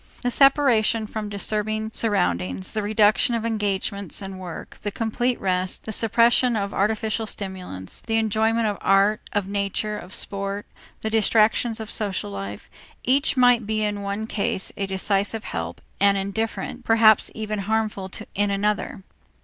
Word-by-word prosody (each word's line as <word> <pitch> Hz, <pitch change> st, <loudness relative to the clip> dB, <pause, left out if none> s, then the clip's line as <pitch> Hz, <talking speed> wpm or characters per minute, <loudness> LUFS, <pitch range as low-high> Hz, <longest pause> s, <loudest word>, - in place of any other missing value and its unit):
The 245 Hz, -, +1 dB
separation 245 Hz, -5 st, +4 dB
from 215 Hz, 0 st, -5 dB
disturbing 215 Hz, +2 st, -2 dB
surroundings, 90 Hz, -, 0 dB
the 215 Hz, -, -1 dB
reduction 215 Hz, +2 st, +3 dB
of 230 Hz, -1 st, -2 dB
engagements 200 Hz, -3 st, -2 dB
and 195 Hz, -1 st, -7 dB
work, 175 Hz, -3 st, -8 dB
the 205 Hz, -, -2 dB
complete 235 Hz, +4 st, -1 dB
rest, 185 Hz, 0 st, -1 dB
the 220 Hz, -, -4 dB
suppression 235 Hz, +3 st, +3 dB
of 200 Hz, -2 st, -2 dB
artificial 220 Hz, +2 st, 0 dB
stimulants, 185 Hz, -, -5 dB
the 225 Hz, -, 0 dB
enjoyment 220 Hz, +1 st, +1 dB
of 205 Hz, -2 st, -1 dB
art, 200 Hz, +2 st, +3 dB
of 205 Hz, -2 st, -1 dB
nature, 200 Hz, +1 st, -2 dB
of 180 Hz, +2 st, -6 dB
sport, 200 Hz, 0 st, -1 dB, 0.4 s
the 220 Hz, -, -2 dB
distractions 220 Hz, +1 st, +3 dB
of 220 Hz, -1 st, -5 dB
social 195 Hz, -, -2 dB
life, 100 Hz, +1 st, -6 dB, 0.4 s
each 275 Hz, +3 st, +2 dB
might 245 Hz, -3 st, +4 dB
be 215 Hz, 0 st, 0 dB
in 205 Hz, -1 st, -1 dB
one 200 Hz, +2 st, -3 dB
case 200 Hz, -3 st, -2 dB
a 195 Hz, -, -2 dB
decisive 200 Hz, +3 st, 0 dB
help 85 Hz, +1 st, -5 dB, 0.2 s
and 200 Hz, 0 st, +4 dB
indifferent, 220 Hz, +5 st, -3 dB
perhaps 225 Hz, -2 st, +5 dB
even 215 Hz, -1 st, -3 dB
harmful 210 Hz, -1 st, -1 dB, 0.2 s
in 205 Hz, +1 st, +1 dB
another. 200 Hz, 0 st, -1 dB
210 Hz, 150 wpm, -24 LUFS, 195-220 Hz, 0.4 s, perhaps